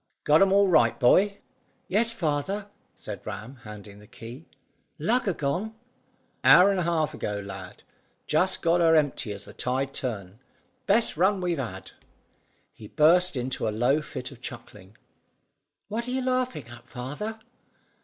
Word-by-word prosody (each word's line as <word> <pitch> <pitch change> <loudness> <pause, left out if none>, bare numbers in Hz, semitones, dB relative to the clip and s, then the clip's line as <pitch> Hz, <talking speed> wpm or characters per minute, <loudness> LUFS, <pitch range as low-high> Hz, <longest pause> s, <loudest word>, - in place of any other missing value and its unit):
"Got 150 +3 +5
'em 195 -1 +5
all 200 0 +5
right, 165 -5 +3
boy?" 195 +10 +4 0.5
"Yes, 225 +4 +2
father," 195 +2 -2 0.2
said 105 -3 -8
Ram, 110 +6 -7
handing 105 -2 -11
the 105 - -16
key. 120 +10 -11 0.5
"Lugger 205 +5 +1
gone?" 180 +11 -2 0.7
"Hour 195 +3 +8
and 195 - 0
a 170 -1 0
half 160 -3 0
ago, 105 -1 -3
lad; 95 -2 -9 0.4
just 180 +5 +1
got 170 +1 +3
her 165 -1 +5
empty 145 -7 +1
as 100 0 -7
the - - -12
tide 135 +2 -2
turned. 105 -5 -5 0.5
Best 215 -4 +2
run 190 +3 +3
we've 175 -4 -1
had." 125 -4 -6 0.8
He 105 - -12
burst 175 - +4
into 125 -1 -2
a - - +2
low 120 +8 +1
fit 125 -3 -7
of 130 -3 -14
chuckling. 105 -5 -10 0.9
"What 230 +4 -4
are - - -3
you 260 0 -1
laughing 255 - -1
at, 120 0 -13
father?" 150 - -6
150 Hz, 155 wpm, -26 LUFS, 120-195 Hz, 0.9 s, Hour